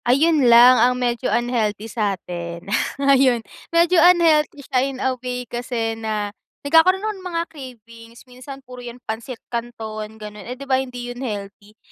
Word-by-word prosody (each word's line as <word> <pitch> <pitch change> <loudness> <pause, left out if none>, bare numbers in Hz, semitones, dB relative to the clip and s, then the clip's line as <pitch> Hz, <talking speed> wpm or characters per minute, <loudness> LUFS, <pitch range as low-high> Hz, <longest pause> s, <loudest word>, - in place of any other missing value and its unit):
Ayun 280 +1 +3
lang 240 +1 +8
ang 250 +1 +3
medyo 245 0 -1
unhealthy 225 -4 -1
sa 210 -3 -1
atin. 170 -1 -7 0.3
Ayun, 270 -4 +3 0.2
medyo 340 +1 +4
unhealthy 320 -5 +4
siya 255 - 0
in 270 0 -2
a 260 0 0
way 250 0 -4
kasi 240 -1 -3
na 215 -2 -3 0.3
nagkakaroon 350 +7 +4
ako 435 - -1
ng 370 - -7
mga 335 -1 -1
cravings. 230 -6 -13
Minsan 260 +2 -11
puro 250 0 -10
yan 240 0 -9
pansit 230 +3 -5 0.2
kanton 220 -2 -5
gano'n, 210 -1 -9
eh, 250 - -5
'di 275 - -9
ba 265 -1 +2
hindi 245 -2 -6
yun 245 - -10
healthy? 205 -2 -7
245 Hz, 165 wpm, -21 LUFS, 225-270 Hz, 0.3 s, lang